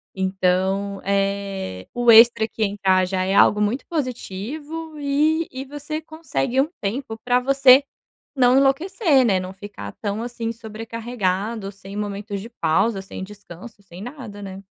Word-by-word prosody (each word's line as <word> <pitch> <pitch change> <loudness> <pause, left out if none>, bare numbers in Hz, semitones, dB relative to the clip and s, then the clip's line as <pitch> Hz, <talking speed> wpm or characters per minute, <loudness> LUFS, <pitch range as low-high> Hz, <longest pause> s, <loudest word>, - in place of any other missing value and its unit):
Então, 190 +1 0
eh, 195 - -2
o 240 -1 +5
extra 225 -1 +7
que 220 - -3
entrar 195 -2 +2
já 185 0 -1
é 190 - 0
algo 210 +1 +5
muito 210 +6 0
positivo 300 - -5
e 305 +3 +1
e 260 +1 -6
você 295 +2 -5
consegue 290 - -1
um 295 - -1
tempo 225 +2 -4
pra 245 0 +3
você 270 +1 +6 0.5
não 250 0 +5
enlouquecer, 285 - +3
né? 195 -5 +3
Não 185 0 -6
ficar 195 - -9
tão, 205 +1 -2
assim, 235 -1 -4
sobrecarregado, 220 -2 -3
sem 195 +1 -10
momentos 205 0 -4
de 225 +4 -9
pausa, 195 +1 +1
sem 190 - -9
descanso, 205 +1 -12
sem 180 -1 -12
nada, 235 -4 -8
né? 195 -1 -8
220 Hz, 145 wpm, -22 LUFS, 195-260 Hz, 0.5 s, extra